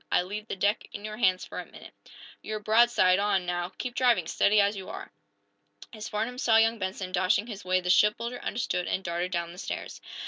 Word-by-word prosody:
"I - - +3
leave 210 +4 -6
the - - -4
deck 205 +3 0
in 205 - -7
your 215 0 -6
hands 185 -5 +2
for - - -7
a - - -6
minute. - - -13 0.5
You're 215 0 -4
broadside 215 -4 +4
on, 200 -3 +1
now. 175 0 -2
Keep 250 -1 -4
driving, 240 -9 +3
steady, 210 +6 +3
as 200 +1 +3
you 190 -1 -7
are!" - - -8 0.8
As 215 -1 -7
Farnum 230 +4 -3
saw 225 -4 +4
young 225 0 +3
Benson 190 -1 -4
dashing 185 +3 +2
his 210 -5 -8
way 185 0 +1
the 180 0 +1
shipbuilder 230 +5 +2
understood 200 -5 -2
and 190 - -1
darted 175 +1 -2
down 170 -1 -2
the 180 - -11
stairs. - - -6
205 Hz, 210 wpm, -28 LUFS, 185-225 Hz, 0.8 s, broadside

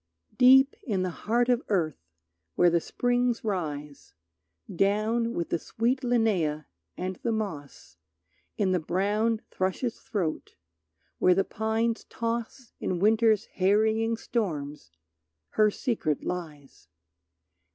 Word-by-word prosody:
Deep 265 +2 +7
in 195 -6 -1
the 185 - -2
heart 235 +7 0
of 245 -1 +2
earth 155 - -1 0.5
where 175 -1 +4
the 170 0 +2
springs 245 +2 0
rise, 150 -8 -4 0.6
Down 215 +5 +1
with 170 - -2
the 170 - 0
sweet 240 +8 -1
linnæa 205 - +1 0.3
and 185 0 -4
the 235 - -2
moss, 145 - -5 0.6
In 195 -3 +1
the 180 - +2
brown 210 +7 0
thrush's 190 +6 -2
throat, 180 -8 -3 0.6
where 180 - +5
the 195 - +3
pines 220 +1 -1
toss 230 +1 -4
In 185 - -2
Winter's 220 +2 +3
harrying 220 +4 +1
storms 150 - -3 0.6
her 215 0 +3
secret 205 - -2
lies. 150 - -7
210 Hz, 115 wpm, -27 LUFS, 170-230 Hz, 0.6 s, Deep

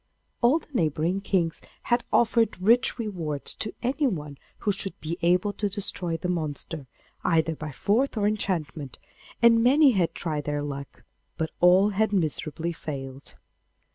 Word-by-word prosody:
All 250 +5 +5
the 330 - -9
neighbouring 170 - 0
kings 180 -5 0 0.2
had 240 0 +1
offered 230 -3 +3
rich 235 +7 +3
rewards 170 - -3
to 215 - -2
anyone 220 - -1 0.2
who 205 - +1
should 195 0 -3
be 165 +3 -5
able 180 +4 +2
to 205 0 -2
destroy 185 -4 -2
the 180 - -4
monster, 155 -3 -3 0.4
either 165 -1 +2
by 155 0 -6
force 225 - +1
or 205 - +1
enchantment, 160 - -2 0.5
and 230 -1 +7
many 275 +3 +6
had 185 -7 0
tried 150 -4 -3
their 145 0 -1
luck, 140 -1 -7 0.3
but 160 0 -2
all 185 +3 +6
had 210 +1 0
miserably 165 -1 -1
failed. 135 -4 -7
180 Hz, 145 wpm, -26 LUFS, 155-215 Hz, 0.5 s, and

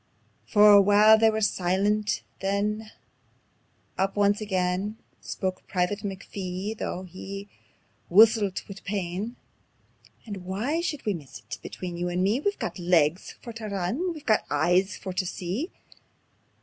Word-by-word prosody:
For 210 -1 +7
a 200 -1 +9
while 210 +2 +6
they 225 0 +6
were 220 0 -1
silent; 200 - +1 0.2
then 210 +2 -1 1.1
up 195 +1 +1
once 205 +1 +2
again 190 +1 -1 0.2
Spoke 185 -1 -4
Private 185 +2 0
McPhee, 195 0 -5
though 185 -3 -4
he 195 +2 -8 0.6
whussilt 210 0 +5
wi' 200 - -9
pain: 200 +3 -3 0.9
"And 205 -3 -6
why 205 - -2
should 300 -5 -3
we 210 - +1
miss 150 -7 -9
it? - - -9
Between 175 -2 -6
you 175 +1 -2
and 180 +1 0
me 210 +6 +2
We've 405 +7 -1 0.2
legs 170 -1 +2
for 235 - -7
tae 225 -1 -7
run, 195 +2 -2
and 355 +1 -1
we've 305 -1 -11 0.2
eyes 175 +6 +2
for 190 - -6
tae 185 - -1
see. 195 - -3
200 Hz, 140 wpm, -26 LUFS, 185-215 Hz, 1.1 s, a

